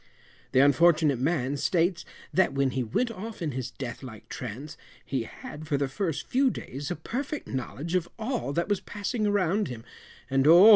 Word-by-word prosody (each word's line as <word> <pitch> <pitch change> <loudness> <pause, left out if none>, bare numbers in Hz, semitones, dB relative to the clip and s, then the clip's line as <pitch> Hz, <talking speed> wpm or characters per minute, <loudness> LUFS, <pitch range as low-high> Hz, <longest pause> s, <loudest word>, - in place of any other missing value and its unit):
The 130 - +6
unfortunate 150 -1 +5
man 140 -1 +1
states 170 +3 +1 0.3
that 185 -6 +4
when 135 -1 +2
he 130 - -1
went 230 - 0
off 220 +1 -7
in 160 -4 -1
his 130 -2 -3
death 125 -4 -6
like 110 -4 -10
trance 130 +6 -6 0.3
he 130 -4 -1
had, 155 +6 -9
for 145 -3 +1
the 140 0 +1
first 160 +3 -2
few 265 +1 +3
days 140 - -5
a - - -1
perfect 270 - -4
knowledge 135 +5 -4
of 180 -2 +1
all 230 - -2
that 170 +3 0
was 205 -2 +1
passing 210 +1 -2
around 205 0 +2
him, 115 -3 -7 0.4
and, 135 +1 +3
oh! 175 +7 +10
155 Hz, 185 wpm, -28 LUFS, 135-195 Hz, 0.4 s, oh